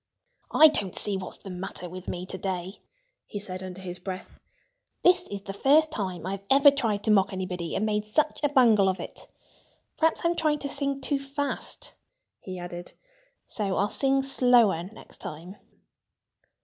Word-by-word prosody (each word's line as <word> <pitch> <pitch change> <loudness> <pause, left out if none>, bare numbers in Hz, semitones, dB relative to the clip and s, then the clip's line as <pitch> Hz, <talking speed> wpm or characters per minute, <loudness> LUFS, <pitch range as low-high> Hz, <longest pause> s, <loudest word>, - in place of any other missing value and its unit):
"I 315 - +8
don't 200 - -2
see 205 - +1
what's 190 -1 -6
the 195 - -10
matter 180 0 -5
with 185 +1 -9
me 180 0 -4
to 190 - -6
day," 190 0 -4 0.5
he - - -6
said 190 -2 -5
under 185 0 -7
his 180 -1 -6
breath. 185 0 -7 0.6
"This 360 0 +4
is 200 -1 -6
the 195 0 -7
first 300 +9 +4
time 185 -5 -3
I 195 +1 -3
ever 280 +1 +7
tried 225 -7 -1
to 220 - +2
mock 195 -1 +4
anybody 180 -3 -4
and 215 - 0
made 210 -1 0
such 300 +9 0
a 290 - +2
bungle 230 -8 +5
of 190 - -2
it.... - - -8 0.7
Perhaps 320 0 +2
I'm 340 0 +2
trying 310 -2 +1
to 280 -1 -5
sing 275 -1 -2
too 280 +1 0
fast," 275 +1 -5 0.5
he 185 -1 -7
added. 175 0 -7 0.5
"So 200 -3 -2
I'll 200 - +1
sing 270 0 +2
slower 245 -9 +4
next - - -12
time." 170 +6 -8
205 Hz, 175 wpm, -27 LUFS, 185-275 Hz, 0.7 s, I